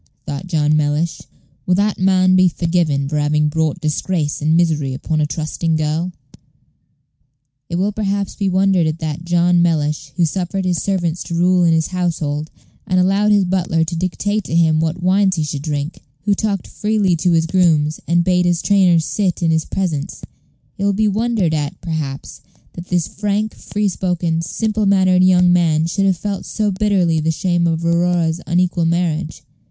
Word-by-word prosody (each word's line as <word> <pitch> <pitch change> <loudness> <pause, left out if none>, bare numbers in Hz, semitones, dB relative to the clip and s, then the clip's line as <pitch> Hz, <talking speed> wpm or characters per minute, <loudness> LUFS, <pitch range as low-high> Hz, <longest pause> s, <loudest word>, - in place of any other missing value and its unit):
thought 145 +2 -5
John 155 -3 +1
Mellish; 155 +2 0 0.5
"will 180 - +3
that 205 +2 0
man 185 0 +3
be 185 0 +5
forgiven 165 -5 0
for 150 +1 -1
having 150 +1 +1
brought 160 +2 -1
disgrace 155 0 -2
and 155 +2 +2
misery 150 -6 0
upon 155 +3 -2
a 150 - +1
trusting 160 +2 -2
girl?" 155 +3 -1 1.6
It 170 - -3
will 195 +4 0
perhaps 200 -1 -2
be 200 -2 -1
wondered 190 -2 +2
at 155 0 -2
that 160 0 -4
John 175 0 +3
Mellish, 150 -3 0
who 175 - +2
suffered 185 +3 -3
his 180 -2 0
servants 175 -4 -1
to 170 - -4
rule 180 +1 +3
in 165 -1 +4
his 160 -1 +1
household, 160 -4 -2 0.4
and 185 0 +2
allowed 195 +3 +2
his 200 -2 +3
butler 175 -3 0
to 165 +1 -4
dictate 195 +4 -2
to - - -3
him 160 -2 +3
what 165 +3 -2
wines 190 +1 +3
he 160 - -1
should 145 -2 -4
drink, 145 +1 -4 0.2
who 205 +1 +2
talked 200 -2 -2
freely 210 -4 0
to 175 +2 +1
his 165 -1 +2
grooms, 160 -4 +2
and 170 +1 +2
bade 180 0 +2
his 175 -1 0
trainer 185 -4 +4
sit 180 +2 -1
in 165 - +2
his 160 -1 +1
presence 170 -4 -3 0.6
it - - -2
will 200 0 +2
be 215 +2 +1
wondered 210 -5 0
at, 145 -2 -3
perhaps, 155 -5 -5 0.3
that 175 +1 -9
this 175 -2 0
frank, 210 +1 -2
free 210 0 -3
spoken, 175 -3 -1
simple 215 +4 -1
mannered 185 -2 +4
young 180 -1 +4
man 160 -3 +2
should 195 +3 0
have 190 -2 +1
felt 195 +1 -4
so 210 -2 -1
bitterly 190 -5 +1
the 155 +1 -1
shame 175 +1 0
of 165 0 -1
Aurora's 170 0 +1
unequal 175 0 +1
marriage. 165 -1 -1
175 Hz, 180 wpm, -18 LUFS, 160-190 Hz, 1.6 s, be